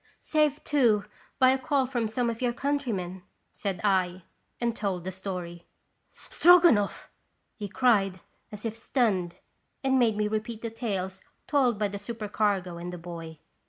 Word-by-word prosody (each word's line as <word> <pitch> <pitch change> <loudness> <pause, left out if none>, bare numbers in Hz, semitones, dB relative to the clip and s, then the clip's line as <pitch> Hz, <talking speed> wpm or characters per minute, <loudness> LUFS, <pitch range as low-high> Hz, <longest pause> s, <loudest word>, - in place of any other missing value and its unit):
" - - -33
Saved, 300 -1 +1
too, 235 -8 +3 0.3
by 255 -2 +6
a 265 - +1
call 275 0 +1
from 245 -3 -1
some 235 +3 -1
of 230 - -8
your 245 -1 +1
countrymen," 235 -11 -2 0.3
said 195 -4 -3
I, 185 -3 +1 0.4
and 235 -1 0
told 190 -5 -2
the 190 - -4
story. 180 -2 -6 0.5
"Stroganoff 340 - +4 0.2
!" - - -47
he 205 - -3
cried, 200 -4 +2 0.3
as 210 +1 -8
if 225 -1 -2
stunned, 200 -8 0 0.5
and 265 -1 +3
made 225 -4 +3
me 210 0 +1
repeat 215 +1 -3
the 230 - -3
tales 190 -5 -3 0.2
told 260 -6 +2
by 210 0 +1
the 200 0 -6
super 215 +1 -6
cargo 195 -4 0
and 175 +1 -6
the 180 - -6
boy. 165 -2 -8
210 Hz, 165 wpm, -28 LUFS, 185-245 Hz, 0.5 s, by